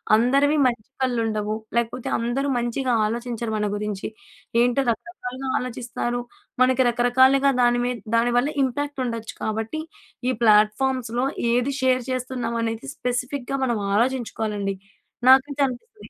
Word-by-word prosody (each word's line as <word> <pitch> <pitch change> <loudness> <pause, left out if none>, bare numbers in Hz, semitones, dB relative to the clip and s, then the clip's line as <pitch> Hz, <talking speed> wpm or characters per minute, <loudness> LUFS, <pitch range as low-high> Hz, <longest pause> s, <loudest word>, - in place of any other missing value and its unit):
అందరివి 275 +6 +3
మంచి 235 -1 -3
కళ్ళు 250 -3 +1
ఉండవు. 215 -1 -1 0.2
లేకపోతే 235 +1 -1
అందరూ 240 +4 -1
మంచిగా 240 +2 -1
ఆలోచించరు 235 0 -3
మన 210 - 0
గురించి. 205 -1 -3 0.5
ఏంటో 245 +2 +3
రకరకాలుగా 260 -1 -6
ఆలోచిస్తారు. 245 0 -3 0.4
మనకి 260 0 +4
రకరకాలుగా 260 +3 +4
దాని 240 0 +3
మీద 250 -1 -1 0.2
దాని 235 +1 +3
వల్ల 275 +5 +2
ఇంపాక్ట్ 280 +2 -2
ఉండొచ్చు 230 -2 -4
కాబట్టి 220 +7 -2 0.5
ఈ - - +3
ప్లాట్ఫార్మ్‌స్‌లో 235 +3 +3 0.3
ఏది 245 +3 +1
షేర్ 255 -1 +2
చేస్తున్నాం 250 -2 -3
అనేది 225 +3 -3
స్పెసిఫిక్‌గా 250 +2 -2
మనం 240 -3 +1 0.2
ఆలోచించుకోవాలండి. 220 -4 -1 0.5
నాకైతే 275 +2 +5
అనిపిస్తుంది. 415 - -10
245 Hz, 125 wpm, -23 LUFS, 230-260 Hz, 0.5 s, నాకైతే